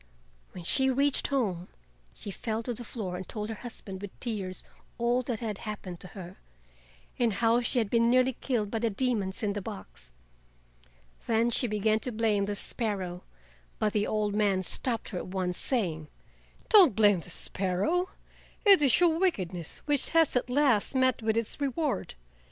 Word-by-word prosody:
When 180 - -8
she 265 +9 +2
reached 275 +1 +2
home 200 -11 -1 0.5
she 200 - -7
fell 220 +3 -3
to 245 - -3
the 240 - -7
floor 200 -6 -5
and 185 -1 -8
told 210 -1 -4
her - - -2
husband 195 -5 -7
with 205 -1 -9
tears 200 -6 -4 0.3
all 240 +1 +2
that 245 -3 -4
had 215 -3 -3
happened 200 -5 -6
to - - -7
her, 180 0 -9 0.8
and 235 -3 +2
how 230 +4 +3
she 240 - -2
had 220 -4 +1
been 230 0 +4
nearly 255 +1 +4
killed 225 -5 -2
by 225 - -1
the 230 0 +1
demons 215 -4 -1
in 205 -1 0
the 205 - -4
box. - - -9 1.2
Then 230 +1 +2
she 245 - +2
began 215 0 +1
to 250 - -4
blame 215 -3 +1
the 205 0 -3
sparrow, 195 -5 -2 0.6
but 210 -1 0
the 210 -1 +1
old 210 -1 0
man 200 -3 +2
stopped 230 +5 -3
her 180 - -4
at - - -7
once, 185 -1 -2
saying: 170 - -1 0.6
"Don't 375 - +7
blame 205 -4 +5
the - - -11
sparrow, 200 - +1 0.6
it 395 -5 +8
is 270 -5 +4
your 335 -2 +3
wickedness 185 - -2
which 290 -2 +1
has 325 -4 +3
at 250 - 0
last 260 -3 +2
met 260 -2 +2
with 220 0 0
its 230 +5 -2
reward. 280 - -1
220 Hz, 175 wpm, -29 LUFS, 195-250 Hz, 1.2 s, it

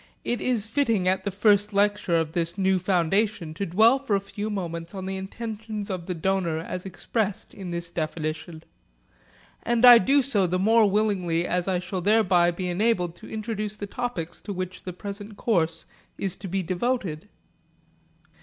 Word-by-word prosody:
It 240 - -2
is 240 -5 +2
fitting 225 -6 +1
at 190 +1 +1
the - - +1
first 205 +1 +3
lecture 205 -3 +2
of 160 -2 +1
this 170 +2 -2
new 190 -1 +2
foundation 185 -1 0
to 200 +5 -3
dwell 220 +9 +5
for 245 -7 0
a - - +2
few 205 +2 -5
moments 170 -3 -5
on 190 -1 -5
the 190 0 -3
intentions 215 +1 -5
of 180 -2 -5
the 180 - -2
donor 175 -1 0
as 180 +3 -5
expressed 205 +2 -3
in 190 -3 -7
this 170 0 -4
definition; 160 0 -4 1.0
and 240 +1 +2
I 240 -1 +11
do 275 +7 +3
so 210 -8 +2
the 180 +1 0
more 215 +2 +4
willingly 190 -5 +1
as 180 +1 -1
I 185 -1 +1
shall 185 +1 -4
thereby 185 -4 +4
be 180 +1 -3
enabled 180 -2 +1
to - - -12
introduce 215 -1 -3
the 205 - -5
topics 200 -6 -4
to 205 - -5
which 185 0 -5
the 180 - -6
present 205 +2 -7
course 165 -7 0 0.3
is 190 -3 -2
to 195 - -7
be 190 +1 -1
devoted. 185 -2 -2
195 Hz, 175 wpm, -25 LUFS, 175-215 Hz, 1.0 s, I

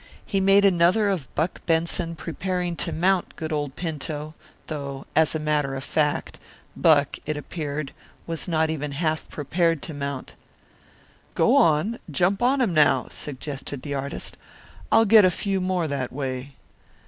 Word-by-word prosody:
He 195 - 0
made 195 +1 +5
another 190 +3 +4
of 175 -10 -2
Buck 165 +3 -1
Benson 165 0 +1
preparing 180 +1 -3
to - - -1
mount 185 +2 +1
good 160 -1 -4
old 145 -3 -2
Pinto; 155 -2 -4 0.3
though, 140 -3 -5
as 160 0 +3
a - - 0
matter 150 -3 0
of 135 - -5
fact, 150 0 -1 0.4
Buck, 145 -4 +3
it 155 -1 -1
appeared, 150 -2 -4 0.3
was 165 +1 -4
not 160 -2 +1
even 150 -2 -3
half 155 +1 -1
prepared 165 +1 0
to 160 - -5
mount. 140 -2 -5 1.0
"Go - - +4
on, 170 +9 +3
jump 180 +6 +1
on 260 +3 +3
him 220 -8 +1
now," 145 -5 +3
suggested 140 -1 -6
the 145 - -4
artist. 140 0 -5 0.5
"I'll 225 0 +6
get 215 0 +7
a 185 - +6
few 195 +1 -1
more 180 -2 0
that 140 -3 -3
way." 135 0 -4
155 Hz, 155 wpm, -24 LUFS, 145-180 Hz, 1.0 s, get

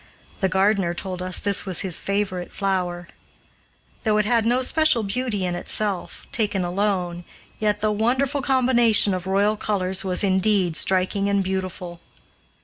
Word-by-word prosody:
The 190 - +1
gardener 190 -2 +1
told 185 0 -5
us 185 0 +1
this 200 0 +1
was 185 -3 +1
his 185 -4 +1
favorite 195 -3 -3
flower. 180 -3 -2 1.0
Though 215 -2 +2
it 210 - +1
had 230 0 +1
no 250 +2 +1
special 310 -5 +2
beauty 210 -1 -2
in 180 - -2
itself, 195 +2 -3
taken 205 -4 0
alone, 180 -2 -2 0.4
yet 210 -1 0
the 215 0 +1
wonderful 255 +6 0
combination 240 -6 +3
of 185 0 -4
royal 200 +2 +2
colors 190 -3 0
was 185 0 0
indeed 190 -2 +1
striking 190 +3 +1
and 200 -1 +1
beautiful. 185 -2 -5
195 Hz, 145 wpm, -22 LUFS, 185-215 Hz, 1.0 s, combination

